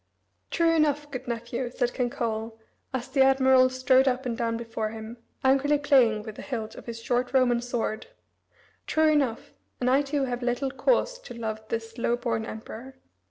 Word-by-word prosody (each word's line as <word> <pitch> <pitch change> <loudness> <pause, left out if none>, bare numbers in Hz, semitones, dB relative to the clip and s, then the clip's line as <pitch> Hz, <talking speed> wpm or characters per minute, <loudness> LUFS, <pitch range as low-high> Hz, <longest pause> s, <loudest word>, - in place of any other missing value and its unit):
"True 335 -1 +2
enough, 295 -2 +1
good 255 -1 -6
nephew," 235 +1 -3
said 245 0 -1
King 250 -2 0
Coel, 225 -1 -3 0.3
as 260 -2 -3
the 275 - +1
admiral 265 -1 +5
strode 260 +1 +3
up 260 0 0
and 240 -2 -1
down 230 -1 -1
before 225 -2 -3
him, 220 +2 -8 0.3
angrily 275 +2 +3
playing 250 -7 +3
with 215 -1 -9
the - - -7
hilt 225 -6 -4
of - - -12
his 230 -1 -5
short 245 +2 -1
Roman 245 -2 +3
sword, 240 - -3 0.8
"true 315 0 +3
enough, 275 -7 0 0.3
and 250 0 +1
I 270 +2 +5
too 285 0 -1
have 245 -1 -2
little 245 +2 -1
cause - - +1
to - - -10
love 220 -2 -4
this 225 +1 -4
low 235 0 +2
born 230 -2 -2
emperor. 230 +4 -8
245 Hz, 180 wpm, -27 LUFS, 230-270 Hz, 0.8 s, admiral